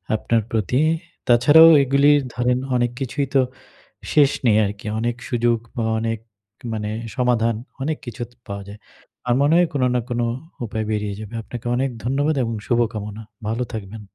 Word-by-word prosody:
আপনার 115 +1 +1
প্রতি। 115 +4 +1 0.5
তাছাড়াও 145 +7 +8
এগুলি 140 +2 +4 0.2
ধরেন 125 +1 +1 0.2
অনেক 120 -1 +1
কিছুই 135 +2 -2
তো, 135 - +6 0.7
শেষ 145 -3 +5 0.2
নেই 110 -2 +5
আরকি। 100 +1 -6
অনেক 120 +1 -1
সুযোগ 120 -2 +2 0.2
বা 115 - 0
অনেক 115 -1 -2 0.5
মানে 105 -1 -3 0.3
সমাধান 120 -3 +2 0.3
অনেক 155 +2 -1
কিছু 120 0 -7
তো - - -26
পাওয়া 100 0 -5
যায়। 105 +1 -10 0.5
আমার 120 - +3
মনে 150 +3 +3
হয় 175 -1 +4
কোন 135 -3 0
না - - +3
কোন 120 0 -2 0.5
উপায় 110 0 -3
বেরিয়ে 105 -1 -2
যাবে। 110 +1 -9
আপনাকে 120 +2 -9
অনেক 135 +2 0 0.2
ধন্যবাদ 145 +4 +1
এবং 115 0 -2
শুভকামনা। 110 -3 -1 0.3
ভালো 115 +3 -1
থাকবেন। 105 0 -6
120 Hz, 160 wpm, -22 LUFS, 110-130 Hz, 0.7 s, তাছাড়াও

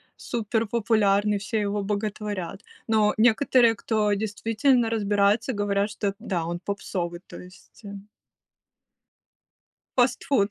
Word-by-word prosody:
суперпопулярный, 215 -2 0
все 215 +3 -2
его 205 0 -1
боготворят. 205 -2 -4 0.2
Но 215 -1 +3
некоторые, 235 +1 +4
кто 210 -1 0
действительно 225 +4 +1
разбирается, 210 +2 +1
говорят, 205 0 0
что 205 -2 -3
да, 185 -7 -3
он 175 +1 -4
попсовый, 180 -3 -4
то - - -10
есть, 180 +5 -16
э 200 - -7 2.1
Фастфуд. 245 -3 +2
210 Hz, 105 wpm, -25 LUFS, 200-225 Hz, 2.1 s, некоторые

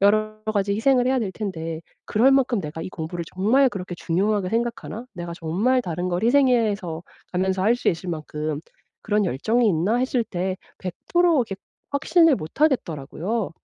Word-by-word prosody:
여러 215 +1 +3 0.2
가지 200 0 +1
희생을 250 +3 +3
해야 260 0 +2
될 205 -5 -2
텐데 165 -6 -4 0.3
'그럴 240 +6 +4
만큼 260 -5 +3
내가 155 +1 -6
이 - - -5
공부를 170 0 -5
정말 250 +8 +4
그렇게 185 -4 -6
중요하게 195 +3 0
생각하나? 235 +1 -3
내가 175 -1 -5
정말 200 +11 +1
다른 175 0 -3
걸 175 +3 -1
희생해서 225 - +2 0.3
가면서 190 +1 0
할 225 +4 +4
수 - - 0
있을 175 +2 -1
만큼 155 -2 -3 0.4
그런 210 -1 +1
열정이 220 - +1
있나?' 195 +5 +2
했을 255 -1 +1
때 185 -2 -3 0.2
100% 335 - +1
이렇게 195 - -4 0.3
확신을 310 +2 +4
못 155 - -9
하겠더라고요. 195 - 0
200 Hz, 345 characters per minute, -23 LUFS, 175-240 Hz, 0.4 s, 그럴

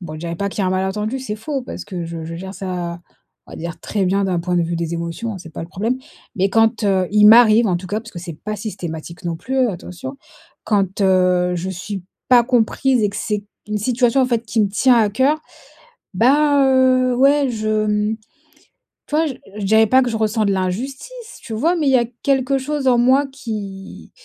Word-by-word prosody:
bon, 155 -2 -7
je 155 - -8
dirais 170 0 -4
pas 200 +1 -2
qu'il 200 - -3
y - - +1
a - - +1
un - - -1
malentendu 210 +6 -1
c'est 215 -5 -5
faux, 270 +4 -4
parce - - -7
que 180 -4 -5
je 165 -1 -6
je 165 +1 -6
gère 190 +2 -7
ça, 175 -3 -5 0.5
on - - -14
va - - -8
dire 170 +1 -6
très 200 -3 -1
bien 195 +2 +1
d'un 180 -3 0
point 180 0 -1
de 170 - +3
vue 170 0 -2
des 170 0 -3
émotions, 170 +7 -4
hein, - - -7
c'est 165 -3 -12
pas - - -6
le 165 - -8
problème, 225 +8 -2 0.4
mais 195 +1 +2
quand, 225 +1 +2
heu, 190 -2 +2
il 210 0 +6
m'arrive 225 0 +7
en 175 - +1
tout 185 +1 -7
cas 210 +3 -2
parce 225 0 -12
que 175 - -7
c'est 170 -4 -8
pas 215 0 -3
systématique 175 -5 -7
non 170 -1 -2
plus, 260 +5 0
attention, 190 +8 -7 0.5
quand, 200 -2 0
heu, 180 -1 +3
je 180 +2 -4
suis 190 +1 -6 0.3
pas 245 -2 +6
comprise 250 0 +1
et 205 - +1
que 200 - -8
c'est 210 -1 -2 0.2
une 210 - -1
situation 245 +3 +2
en 255 - +2
fait, 235 -2 -1
qui 225 - 0
me 200 - +1
tient 240 +5 +3
à 215 -2 +3
coeur, 265 +8 +2 0.8
bah, 280 +6 +4
heu, 255 -1 +3
ouais, 275 +1 +4
je, 215 -1 -1
mmh, 210 +1 0 0.9
tu 295 - -5
vois, 320 - +3
je 280 - -2 0.3
je 200 - -3
dirais 220 +2 +4
pas 260 +4 +4
que 245 - -1
je 225 - -2
ressens 220 0 +1
de 200 - +2
l'injustice, 265 - -4
tu 225 - -6
vois? 330 +10 +1
Mais 305 -3 -1
il 270 - +4
y - - +6
a 235 - +1 0.2
quelque 270 0 +1
chose 285 0 -3
en 245 -2 +4
moi 260 +4 +4
qui 205 -7 -7
215 Hz, 235 wpm, -19 LUFS, 185-255 Hz, 0.9 s, m'arrive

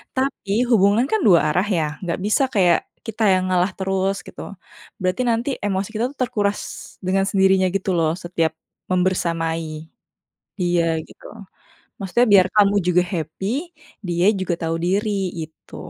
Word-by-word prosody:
Tapi, 250 -5 0
hubungan 210 +2 +4
kan 440 - +2
dua 175 -4 +7
arah, 180 +6 +1
ya? 160 - +1 0.2
Nggak 175 -1 -2
bisa 215 +6 +2
kayak 180 -5 +4 0.3
kita 225 0 -3
yang 185 - 0
ngalah 180 +1 +2
terus, 195 0 0
gitu. - - -10 0.6
Berarti 185 +5 0
nanti 235 +4 0 0.2
emosi 195 0 -1
kita 220 - -1
itu - - -19
terkuras 205 -4 -1 0.5
dengan 195 +1 +1
sendirinya 190 -1 +3
gitu 195 - -1
loh, 160 -1 +2
setiap 165 -2 -1 0.4
membersamai 165 -3 -1 0.7
dia, 175 -2 +1 0.2
gitu. - - -15 0.8
Maksudnya 195 +6 +2
biar 185 -2 +7
kamu 205 -1 +5
juga 180 0 +4
happy, 165 +3 -4 0.6
dia 175 +1 +1
juga 185 -2 -1
tahu 165 0 -1
diri, 205 +4 0 0.3
gitu. 160 0 -10
190 Hz, 145 wpm, -21 LUFS, 175-205 Hz, 0.8 s, dua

